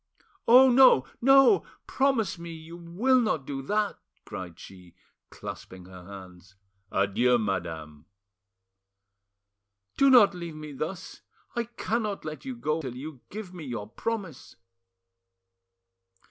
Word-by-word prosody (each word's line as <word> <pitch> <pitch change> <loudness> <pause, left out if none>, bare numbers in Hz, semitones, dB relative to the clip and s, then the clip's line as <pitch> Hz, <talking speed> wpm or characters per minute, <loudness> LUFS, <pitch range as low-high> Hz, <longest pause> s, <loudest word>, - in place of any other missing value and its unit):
"Oh 255 +2 +8
no! 250 - +6 0.2
no! 270 +7 +6 0.2
Promise 235 -10 0
me 170 0 -8
you 165 +1 -10
will 195 +10 +1
not 165 - -1
do 135 -1 -5
that!" 210 +8 -1 0.3
cried 95 -5 -8
she, 90 -3 -14 0.3
clasping 95 -1 -9
her 90 -1 -12
hands. 95 -1 -12 0.4
"Adieu, 110 +6 +2
madame." 80 -7 -4 1.9
"Do 275 - +5
not 240 -7 +7
leave 170 -3 -7
me 155 -1 -8
thus! 165 +7 -6 0.3
I 235 0 -1
cannot 225 -3 -3
let 155 - -7
you 260 -1 -5
go 160 -8 -2
till 130 -4 -6
you 135 0 -8
give 200 -3 -8
me 175 -3 -8
your 115 -5 -5
promise!" 195 - -5
160 Hz, 120 wpm, -27 LUFS, -, 1.9 s, Oh